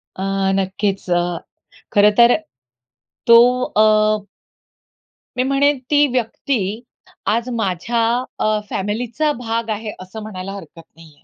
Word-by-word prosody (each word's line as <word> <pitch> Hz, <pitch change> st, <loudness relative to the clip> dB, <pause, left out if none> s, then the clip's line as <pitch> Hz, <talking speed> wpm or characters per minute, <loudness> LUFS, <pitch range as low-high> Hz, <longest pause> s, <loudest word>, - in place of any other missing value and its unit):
अ, 190 Hz, -, -7 dB, 0.3 s
नक्कीच. 195 Hz, 0 st, -2 dB
अ, 175 Hz, -1 st, 0 dB, 0.5 s
खरंतर 210 Hz, +4 st, +5 dB, 0.9 s
तो 235 Hz, 0 st, +9 dB, 0.4 s
अ 215 Hz, -1 st, +3 dB, 1.1 s
मी 255 Hz, -, +2 dB
म्हणेन 275 Hz, +2 st, +2 dB
ती 295 Hz, 0 st, +5 dB
व्यक्ती, 225 Hz, -3 st, -2 dB, 0.5 s
आज 230 Hz, +3 st, +1 dB
माझ्या 220 Hz, +3 st, -1 dB, 0.4 s
अ, 215 Hz, 0 st, +1 dB
फॅमिलीचा 235 Hz, +9 st, -1 dB
भाग 230 Hz, -1 st, -3 dB
आहे 215 Hz, 0 st, -3 dB
असं 185 Hz, +4 st, -9 dB
म्हणायला 195 Hz, -3 st, -7 dB
हरकत 165 Hz, -3 st, -11 dB
नाही 160 Hz, -2 st, -17 dB
आहे. -, -, -30 dB
215 Hz, 110 wpm, -19 LUFS, 190-235 Hz, 1.1 s, तो